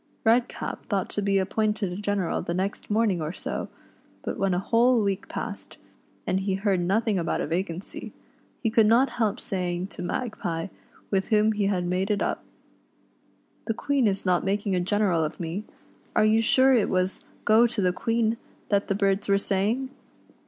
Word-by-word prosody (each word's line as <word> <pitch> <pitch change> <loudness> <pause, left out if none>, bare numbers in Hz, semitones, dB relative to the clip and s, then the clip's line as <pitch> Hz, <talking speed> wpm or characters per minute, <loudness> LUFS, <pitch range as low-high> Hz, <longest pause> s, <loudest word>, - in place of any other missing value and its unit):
Redcap 235 +2 0
thought 200 -4 0
to 205 - -1
be 200 -1 +2
appointed 210 0 0
a - - -5
general 205 -3 -1
the 170 - -3
next 190 +2 -3
morning 210 -5 +2
or 155 0 -2
so, - - -4 0.6
but - - -3
when 195 -2 +2
a - - +1
whole 235 +3 +3
week 195 -2 -1
passed, - - -6 0.5
and 190 - +1
he 195 0 -1
heard 195 -1 +1
nothing 200 +3 +1
about 170 - -1
a - - -1
vacancy, 180 +6 -4 0.5
he 225 - +1
could 220 -1 +5
not 240 +5 +4
help 210 -2 +1
say 180 -2 -2
ing 175 +1 -3
to 195 - -9
Magpie, 180 -4 -3 0.4
with 190 -1 +1
whom 215 -1 +3
he 205 -2 0
had 185 -3 0
made 185 +3 0
it 205 -1 +1
up: - - -2 1.2
"The 225 - -1
Queen 275 -2 +1
is 195 -1 -1
not 180 -1 +2
making 200 0 0
a - - +2
general 185 -2 +1
of 155 - -4
me, 175 +5 -4 0.5
are - - +5
you 220 +1 +4
sure 260 +4 +4
.t 230 -5 +4
was 185 0 -1 0.2
'Go 225 +3 +6
to 235 -1 -4
the 180 -2 +2
Queen' 230 +2 0 0.3
that 200 -1 +2
the 195 - 0
birds 200 0 +1
were 200 - +5
saying.?" 210 +7 0
200 Hz, 185 wpm, -26 LUFS, 185-220 Hz, 1.2 s, Go